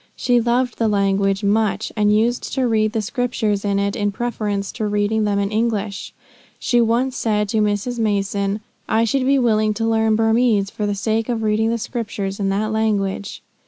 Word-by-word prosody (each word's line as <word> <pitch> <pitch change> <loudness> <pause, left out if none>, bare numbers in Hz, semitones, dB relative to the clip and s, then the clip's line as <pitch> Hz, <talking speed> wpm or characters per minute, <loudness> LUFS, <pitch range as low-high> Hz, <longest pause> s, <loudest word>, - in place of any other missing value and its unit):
She 245 -1 +2
loved 240 +1 0
the 225 - +2
language 195 -1 +1
much; 205 0 +1
and 210 -1 +2
used 230 +3 +1
to 260 -2 +1
read 215 -1 +1
the 220 -2 -1
Scriptures 225 -3 -1
in 200 -1 0
it 200 0 0
in 205 -3 0
preference 205 -3 -3
to 215 - -3
reading 210 +1 0
them 205 -1 0
in 200 0 -1
English. 215 -3 -2 0.5
She 240 -1 +2
once 240 +3 +1
said 210 -2 0
to 220 - 0
Mrs. 210 +4 -1
Mason, 200 -1 -1 0.3
"I 220 +1 +3
should 255 +3 0
be 275 0 +4
willing 215 -4 +2
to 225 +2 -1
learn 220 -1 +2
Burmese, 225 -2 +2
for 210 - -3
the 205 - -1
sake 220 +3 -1
of 230 -2 -1
reading 215 +1 +1
the 235 - 0
Scriptures 210 -4 -4
in 195 -1 0
that 210 +3 -1
language." 205 -3 -1
215 Hz, 190 wpm, -20 LUFS, 205-230 Hz, 0.5 s, be